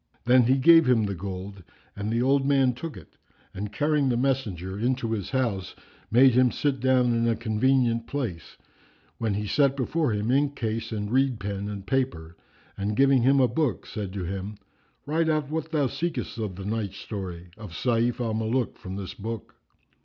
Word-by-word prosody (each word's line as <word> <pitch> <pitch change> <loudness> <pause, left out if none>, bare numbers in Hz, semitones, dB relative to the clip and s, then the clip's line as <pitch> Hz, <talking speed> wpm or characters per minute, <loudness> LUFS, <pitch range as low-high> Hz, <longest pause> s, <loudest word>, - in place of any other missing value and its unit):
Then 125 0 +5
he 130 +3 +3
gave 165 +1 +6
him 115 -3 +4
the 100 -1 -1
gold 95 +1 -6 0.3
and 105 +1 -3
the 115 +1 +1
old 135 +1 +3
man 135 -2 +3
took 150 +6 -7
it - - -15 0.4
and 100 +2 -5
carrying 145 +3 +1
the 120 - +1
messenger 105 -8 -1
into 125 0 0
his 105 -4 -3
house 115 -9 -1 0.3
made 130 +2 +6
him 125 +1 +5
sit 140 -3 -1
down 125 -1 +3
in 115 0 +1
a 115 - +2
convenient 115 +1 +1
place, 115 - -5 0.6
when 110 -3 0
he 105 +1 -2
set 140 +6 +2
before 150 +2 0
him 105 +2 -1
ink 140 +1 +2
case 115 -1 -3
and 105 -1 -3
reed 130 -2 +2
pen 100 +1 -4
and 100 -2 -6
paper 95 -11 -2 0.4
and 100 +2 -2
giving 135 -2 +5
him 135 +3 +4
a 130 - +5
book, 130 +3 -1
said 100 -4 -5
to 100 -2 -4
him, 95 +3 -5 0.5
"Write 160 +2 +1
out 155 -2 0
what 160 0 -3
thou 150 -4 +2
seekest 150 -3 -3
of 105 -4 -3
the 95 +1 -7
night 105 -2 -2
story[FN#352] 90 -3 -7
of 105 -3 -8
Sayf 120 +4 0
al 115 -3 -1
Muluk 110 +3 -1
from 95 -4 -7
this 95 -2 -6
book." 115 +1 -6
115 Hz, 190 wpm, -26 LUFS, 100-135 Hz, 0.6 s, gave